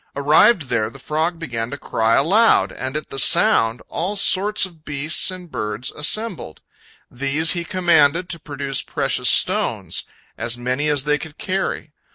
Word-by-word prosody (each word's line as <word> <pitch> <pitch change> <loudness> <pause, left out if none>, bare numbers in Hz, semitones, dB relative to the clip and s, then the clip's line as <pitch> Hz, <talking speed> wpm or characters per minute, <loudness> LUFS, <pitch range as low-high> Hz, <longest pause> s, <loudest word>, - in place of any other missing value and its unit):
Arrived 150 +7 +4
there, 115 -4 -1
the 135 - -12
frog 160 +5 -2
began 120 -8 -4
to 140 - -6
cry 115 -4 0
aloud, 200 +11 +3
and 130 +3 -4
at 155 - -8
the 135 - -3
sound 130 - +3
all 190 +5 -3
sorts 200 +1 +2
of 165 -4 -13
beasts 150 +4 -1
and 180 -3 -9
birds 105 +3 -4
assembled. 180 - -2 0.5
These 140 +6 0
he 175 -1 -1
commanded 175 -2 +2
to 170 -2 -3
produce 140 -2 -4
precious - - 0
stones, - - +1 0.4
as 115 +1 -2
many 130 +5 -2
as 145 -3 +1
they 150 0 +1
could 155 -1 -10
carry. 185 -4 -3
150 Hz, 160 wpm, -20 LUFS, 130-175 Hz, 0.5 s, Arrived